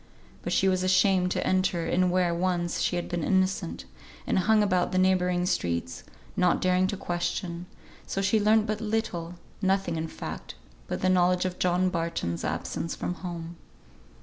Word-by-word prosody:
But - - -4
she 195 - +3
was 185 -1 +2
ashamed 185 0 +3
to - - -1
enter 185 -2 +1
in 180 +2 +2
where 180 -1 +2
once 175 0 -1
she - - +1
had 175 - -2
been 175 -2 -3
innocent, 185 - 0 0.4
and - - +1
hung 215 +3 +4
about 180 -3 +1
the 185 - 0
neighbouring 180 -1 +2
streets, 85 - -1 0.3
not 180 -1 +3
daring 185 0 +2
to 200 - -3
question, 175 0 -3 0.4
so - - -2
she 195 +3 +2
learnt 215 +1 +4
but 215 0 -2
little; 195 -6 -2 0.3
nothing 190 -3 +1
in 160 0 -2
fact - - -7 0.3
but - - -3
the 185 - +2
knowledge 180 0 +3
of 180 -1 -3
John 180 +1 +2
Barton's 165 - -2
absence 165 - -3
from - - -3
home. 170 -2 -7
180 Hz, 170 wpm, -27 LUFS, 175-190 Hz, 0.4 s, hung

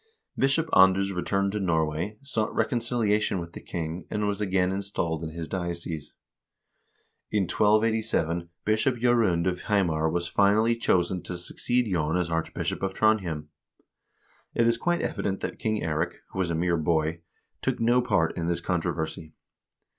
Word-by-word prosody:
Bishop 135 +5 +2
Anders 95 +1 +5
returned 100 +2 0
to 105 - -2
Norway, 80 +2 0
sought 110 -6 -1
reconciliation 115 -5 +1
with 85 0 -7
the - - -8
king, 85 +1 -5
and 105 0 -1
was 100 0 -2
again 95 -2 +1
installed 95 -5 -2
in 80 - -3
his 80 0 -6
diocese. 85 -4 -4 1.1
In 105 -2 +1
1287 105 -5 +1 0.2
Bishop 110 +4 +2
J0rund 115 -8 +2
of 90 - -1
Hamar 85 -6 +1
was 85 +1 -1
finally 105 +5 +3
chosen 90 -5 +1
to 90 +1 -4
succeed 120 +7 0
Jon 80 0 +1
as 85 -2 -1
Archbishop 80 0 -2
of 95 0 -2
Trondhjem. 90 -9 +1 1.1
It 115 - +3
is 115 0 +4
quite 175 +8 0
evident 95 -1 -2
that - - -4
King 110 -1 -1
Eirik, 85 +2 -1 0.2
who 95 - -5
was 90 -2 +1
a 85 - 0
mere 85 +1 +1
boy, 80 0 0 0.4
took - - -1
no 120 +2 +4
part 80 -9 +1
in 85 -1 -2
this 85 -1 +1
controversy. 80 -2 -3
95 Hz, 155 wpm, -27 LUFS, 85-110 Hz, 1.1 s, Anders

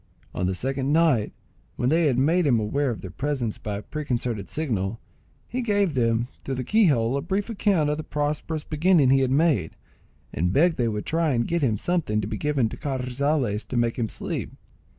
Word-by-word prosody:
On 90 - -1
the 95 - -1
second 135 +5 -1
night, 155 -9 +3 0.4
when 125 - 0
they 165 +1 +3
had 130 -4 +1
made 160 +5 +3
him 120 -5 +4
aware 135 +7 0
of 115 - -4
their 95 - -7
presence 130 -6 -2
by 105 -1 -4
a - - -6
preconcerted 120 - -3
signal, 115 -8 -2 0.5
he 255 - -3
gave 205 -7 +1
them, 115 -2 +1 0.2
through 135 - -3
the 130 - -3
key 220 - +3
hole, 120 -4 +2
a - - -1
brief 195 +7 -2
account 195 -7 +2
of 150 0 0
the - - -4
prosperous 150 +1 -2
beginning 155 -3 +3
he 135 - +5
had 130 -1 +1
made, 135 - +2 0.6
and 90 +4 0
begged 165 - +3
they 120 - +1
would 105 -2 -3
try 160 -2 +1
and 120 -1 0
get 170 0 0
him 115 -6 +1
something 155 - 0
to 105 - -2
be 110 +1 -4
given 145 -4 +1
to - - -8
Carrizales 130 -4 -1
to 125 - -3
make 120 +1 0
him 115 -2 -1
sleep. - - -4
135 Hz, 210 wpm, -25 LUFS, 115-155 Hz, 0.6 s, he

